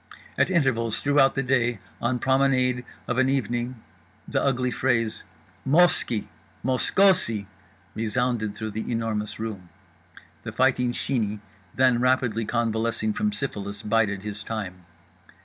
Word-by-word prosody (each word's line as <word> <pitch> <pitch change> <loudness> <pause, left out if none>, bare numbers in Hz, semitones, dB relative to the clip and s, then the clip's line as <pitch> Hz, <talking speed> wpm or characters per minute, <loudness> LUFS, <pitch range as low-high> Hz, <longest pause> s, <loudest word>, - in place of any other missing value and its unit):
At - - +2
intervals 125 - +1
throughout 145 -2 +3
the 135 - 0
day, 120 -2 +1 0.2
on 120 +1 +1
promenade, 130 -1 +2 0.2
of 125 +1 0
an 130 0 +3
evening, 120 -3 -2 0.4
the - - 0
ugly 125 -2 +1
phrase 115 -3 0 0.4
"MOS 170 +6 +5
ki 110 -3 -3 0.4
mosKOsi" 130 - +3 0.5
resounded 110 -1 -1
through 110 0 -5
The 110 +3 -4
Enormous 110 -2 -2
Room. 105 -6 -6 0.7
The 110 - -6
Fighting 125 0 +2
Sheeney, 110 -5 -1 0.4
then 130 -2 +4
rapidly 125 -3 +1
convalescing 115 - 0
from 210 0 0
syphilis, 105 - -4
bided 105 -2 +1
his 105 0 -5
time. 95 -5 -6
120 Hz, 125 wpm, -25 LUFS, 110-130 Hz, 0.7 s, MOS